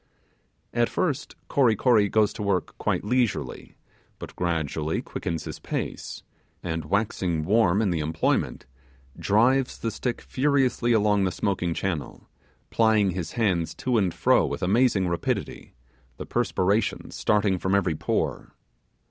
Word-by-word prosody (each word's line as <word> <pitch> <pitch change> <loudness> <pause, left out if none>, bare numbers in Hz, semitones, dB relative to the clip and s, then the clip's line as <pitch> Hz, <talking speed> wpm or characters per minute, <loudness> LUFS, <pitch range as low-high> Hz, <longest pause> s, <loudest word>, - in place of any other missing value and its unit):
At 120 0 +2
first 150 -5 -2
Kory 125 -6 +3
Kory 110 -4 +3
goes 105 0 +2
to - - -7
work 100 -3 -1
quite - - 0
leisurely, 120 +1 -1 0.4
but - - -9
gradually 80 -2 -1
quickens 80 -1 -4
his - - -7
pace, - - -5 0.4
and 80 -3 -3
waxing 90 -3 -1
warm 105 0 +3
in 100 - +1
the 85 - -1
employment, 80 +1 -1 0.5
drives 125 +6 +2
the 115 - -3
stick 120 +3 -3
furiously 130 -3 +1
along 105 -3 +3
the 95 - 0
smoking 90 -2 -1
channel, 85 -6 -4 0.4
plying 110 -4 +3
his 90 -2 -5
hands 95 -8 0
to 125 -3 0
and 95 -3 +1
fro - - +3
with - - -3
amazing 100 0 +3
rapidity, 85 -7 -3 0.4
the - - -6
perspiration 100 +4 0
starting 100 -3 +1
from 95 +2 +1
every 90 -4 +2
pore. 75 - -2
100 Hz, 135 wpm, -25 LUFS, 85-115 Hz, 0.5 s, Kory